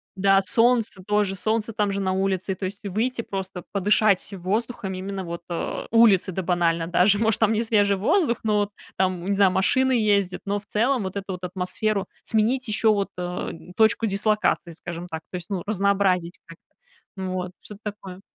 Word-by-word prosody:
Да, 195 0 +4
солнце 230 -1 +1
тоже, 205 -1 +1
солнце 220 +3 -1
там 210 -1 0
же 200 0 -2
на 190 -1 0
улице, 190 0 -1
и - - -8
то 190 - -5
есть 200 +3 -6
выйти 230 +5 -1
просто 190 -4 -6
подышать 200 0 +2
воздухом, 195 +2 -3
именно 190 +1 -5
вот, 170 -1 -6
э, 170 - -3
улице, 220 -5 +5
да 190 - -3
банально 170 -2 +1
даже, 185 +4 +4
может, 220 -1 +2
там 220 -1 +3
не 220 +1 +1
свежий 205 -3 +2
воздух, 235 - +2
но 215 -1 +2
вот 205 0 -1 0.3
там, 185 -2 0
не 200 +1 0
знаю, 195 -1 +4
машины 260 +8 +2
ездят, 205 -5 +1
но 205 +1 -1
в 205 - -20
целом 240 +3 +1
вот 190 0 -5
эту 195 -1 -4
вот 180 0 -8
атмосферу 190 +3 -2 0.2
сменить, 235 +4 +1
ещё 215 +1 +3
вот, 200 -1 -1
э, 180 0 -3 0.3
точку 225 +1 +3
дислокации, 205 -3 +1
скажем 170 +1 -7
так, 160 -2 -6
то - - -7
есть, 180 +2 -6
ну, 190 -3 -1
разнообразить 195 -4 +1
как-то. 165 0 -17 0.5
Вот, 185 -1 -3
что-то 210 -1 -11
такое. 195 -3 -7
200 Hz, 185 wpm, -24 LUFS, 185-215 Hz, 0.5 s, улице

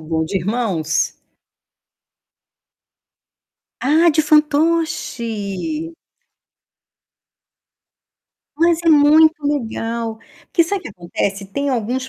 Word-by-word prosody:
bom. 160 0 -2
De 175 +5 -3
irmãos? 185 -5 -1 2.6
Ah, 315 +6 +4
de 310 0 +2
fantoche? 300 - 0 2.6
Mas 335 0 +3
é - - +3
muito 310 +1 +6
legal. 230 -4 -3 0.3
Porque 335 - +2
sabe 395 +4 -2
o - - -19
que - - -7
acontece? 195 +1 -4
Tem 280 +9 -3
alguns 255 +1 -2
265 Hz, 85 wpm, -19 LUFS, 205-315 Hz, 2.6 s, muito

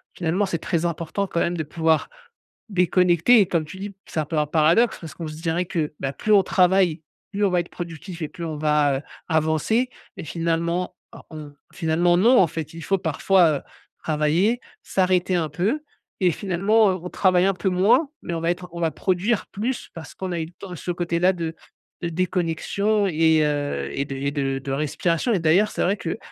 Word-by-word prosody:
finalement, 185 +4 0
c'est 170 - -1
très 170 +1 -1
important 170 +4 -2
quand 170 - -2
même 175 +1 0
de 160 - -2
pouvoir 160 - +1 0.6
déconnecter 180 +4 +4
et, 195 - +4
comme 170 -3 0
tu 155 +5 -10
dis: 200 0 -6
«C'est 160 - -3
un 155 - 0
peu 155 +1 -3
un 150 - 0
paradoxe» 165 +10 +3
parce 160 -3 -8
qu'on 165 - -6
se 155 - -7
dirait 170 +1 0
que, 165 -5 -2
bah, 135 0 -3
plus 215 - -2
on 200 - +7
travaille, 180 -3 +3 0.3
plus 205 0 0
on 195 - +1
va 180 - +2
être 170 - -11
productif 170 0 -8
et - - -2
plus 170 - -9
on 155 -2 -4
va, 150 -2 +2
heu, - - -10 0.3
avancer 160 - +1 0.3
et, 180 - -6
finalement 170 +2 -1 0.2
or - - -13
on 150 -2 -9 0.2
finalement 175 +1 +2
non, 240 +7 +5
en 180 - +5
fait. 160 +1 -6
Il 165 - -8
faut 195 - +1
parfois, 165 -1 +3
heu, - - -18 0.4
travailler, 165 +10 +1 0.2
s'arrêter 185 -1 +1
un 160 -3 0
peu 205 - -1 0.4
et 180 -2 +4
finalement 200 +5 +2 0.2
on 180 - -5
travaille 185 -1 +3
un 195 - +3
peu 190 +1 -1
moins 200 - +3
mais 170 - -4
on 165 - -3
va 165 - 0
être 180 0 -6
on 170 - -6
va 165 - +2
produire 190 +7 0
plus, 240 +5 -4
parce 160 -3 -10
qu'on 190 -1 -5
a 170 - -2
eu 160 - -2
le - - -15
temps 180 0 -9
ce 175 - -7
côté-là 175 +1 +1
de 165 -2 -4 0.5
de 170 - -2
déconnexion 185 +4 0
et 160 -2 +3
heu, 145 -1 -1
et 140 - -1
de 135 - -6
et 140 +1 -2
de 135 -2 -1
de 135 0 -6
respiration. 165 - 0
Et - - +2
d'ailleurs, 175 +6 +3
c'est - - -1
vrai 195 +3 +2
que, 165 +4 -4
170 Hz, 210 wpm, -23 LUFS, 160-190 Hz, 0.6 s, on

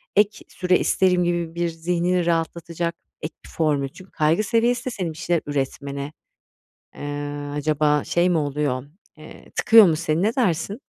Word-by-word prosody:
ek 205 0 +2
süre 180 -1 +1
isterim." 180 -1 +2
gibi, 170 -1 -1
bir 170 0 0
zihnini 175 +2 0
rahatlatacak 170 0 -1 0.3
ek 155 - -5
bir - - -13
formül. 145 -4 0
Çünkü 185 +7 -15
kaygı 155 +6 +2
seviyesi 235 +2 +1
de - - -1
senin 185 -8 -3
bir - - -15
şeyler 170 0 0
üretmene, 140 0 -3 0.8
eee, 145 0 -5
acaba 150 0 +1
şey 175 +1 +2
mi 170 - +2
oluyor, 145 -3 -1 0.3
eee, 155 - -13
tıkıyor 225 -2 +7
mu 160 -3 +2
seni, 155 +1 0
ne 220 +3 +1
dersin? 200 - 0
165 Hz, 160 wpm, -23 LUFS, 150-180 Hz, 0.8 s, tıkıyor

